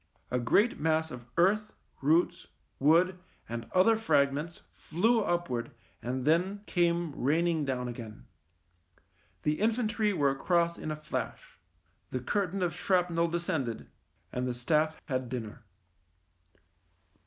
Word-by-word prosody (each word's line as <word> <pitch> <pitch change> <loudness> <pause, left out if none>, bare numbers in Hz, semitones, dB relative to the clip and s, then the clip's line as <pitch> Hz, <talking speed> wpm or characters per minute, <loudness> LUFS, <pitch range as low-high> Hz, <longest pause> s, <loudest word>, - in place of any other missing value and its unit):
A 125 - +1
great 205 - +3
mass 160 +1 +1
of 120 -1 -9
earth, 210 +5 +3 0.3
roots, 165 +4 +2 0.3
wood, 175 +6 +4 0.3
and 115 0 -6
other 190 +5 +5
fragments 150 -5 +1
flew 225 +8 +1
upwards 170 - -1 0.3
and 125 +1 -3
then 180 +6 +2
came 170 -2 +1
rain 155 +6 +1
ing 165 -4 +1
down 125 -2 -2
again. 115 -3 -8 1.2
The 150 0 0
infantry 220 -1 +1
were 145 -7 +2
across 170 +4 +1
in - - -5
a 155 - -2
flash - - -5 0.2
— - - -42
the - - -2
curtain 195 -2 -1
of 175 - 0
shrapnel 175 -3 +1
descended 165 -8 -3 0.2
— - - -42
and 125 0 -1
the 125 - -2
staff 155 +5 +1
had 130 -4 -2
dinner. 115 -4 -5
165 Hz, 130 wpm, -30 LUFS, 135-180 Hz, 1.2 s, other